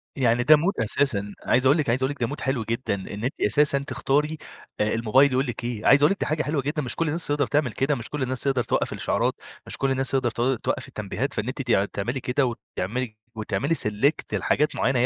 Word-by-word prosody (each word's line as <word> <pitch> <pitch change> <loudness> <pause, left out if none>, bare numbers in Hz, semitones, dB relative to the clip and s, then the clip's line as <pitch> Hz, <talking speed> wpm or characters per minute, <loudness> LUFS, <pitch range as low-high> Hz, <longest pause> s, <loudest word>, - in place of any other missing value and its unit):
يعني 120 -2 +2
ده 155 - +8
mood 165 -6 0
أساسًا، 105 -4 0
عايز 130 +2 +2
أقول 140 +5 +5
لِك 150 -7 0
عايز 130 +2 +1
أقول 135 - +1
لِك 145 -3 -9
ده - - +1
mood 145 - -6
حلو 130 -4 -1
جدًا 115 0 -2
إن 100 +3 -7
أنتِ 130 - -3
أساسًا 140 +6 +3
تختاري 150 +2 -1 0.4
الموبايل 115 +6 +3
يقول 130 +2 +1
لِك 120 -1 -5
إيه 120 -3 -4
عايز 140 +1 +6
أقول 150 - +5
لِك 195 - -2
دي - - -1
حاجة 155 0 -1
حلوة 150 -1 -1
جدًا 145 +3 -2
مش 125 - -1
كل 165 - -1
الناس 165 +3 -1
تِقدَر 145 -2 +1
تعمل 145 -5 +1
كده، 140 +2 0
مش 120 -2 -4
كل 150 -3 -3
الناس 130 0 -2
تقدر 135 -3 +1
توقف - - -1
الإشعارات - - 0 0.3
مش - - +1
كل 135 -1 0
الناس 135 0 0
تقدر 130 -3 +1
تو 125 +4 0
توقف - - -3
التنبيهات، 105 +6 -4
فإن 105 - -3
أنتِ 130 +2 -3 0.3
تعملي 120 +7 -2
كده 130 +2 0 0.3
وتعملي 110 +4 -3 0.2
وتعملي 110 +8 -1
select 120 +5 0
لحاجات 150 +1 +1
معينة 130 -1 +1
هي 125 - +4
130 Hz, 230 wpm, -24 LUFS, 115-145 Hz, 0.4 s, ده